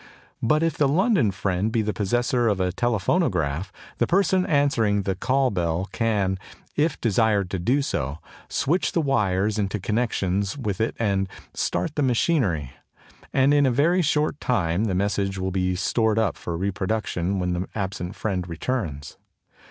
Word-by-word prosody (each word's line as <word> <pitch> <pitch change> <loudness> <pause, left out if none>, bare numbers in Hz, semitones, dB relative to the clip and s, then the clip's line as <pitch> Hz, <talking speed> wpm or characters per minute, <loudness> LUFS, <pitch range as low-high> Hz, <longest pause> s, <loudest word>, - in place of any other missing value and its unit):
But 155 +7 +2
if 165 -3 0
the 145 - +3
London 175 - +3
friend 95 +2 -1
be 115 -1 +1
the 105 0 -1
possessor 120 +5 +1
of 100 -3 +1
a 90 -1 +1
Telephonograph, 100 - 0 0.3
the - - +2
person 190 0 +2
answering 115 - +2
the 95 - 0
call 130 +7 +1
bell 85 0 -1
can, 100 -5 0 0.4
if 150 0 +1
desired 105 -4 +2
to 95 - -2
do 130 +11 +1
so, 70 - -2 0.3
switch 170 +6 0
the - - +2
wires 105 -6 +1
into 100 +1 -1
connection 100 -3 0 0.2
with 105 -5 -2
it 110 - 0
and 100 -4 0 0.2
start 160 - -1
the 150 - -1
machinery; 120 - +1 0.6
and 135 +1 +4
in 145 -1 +4
a - - +3
very 165 +9 +3
short 150 -1 +1
time 95 -4 0
the 95 -4 0
message 100 0 0
will 95 0 -2
be 90 -1 0
stored 110 +3 +1
up 110 -4 +1
for 85 -1 -5
reproduction 95 0 -1
when 90 -1 -1
the 90 +2 -2
absent 95 -3 -4
friend 90 -4 -2
returns. 80 - -4
105 Hz, 160 wpm, -24 LUFS, 95-130 Hz, 0.6 s, and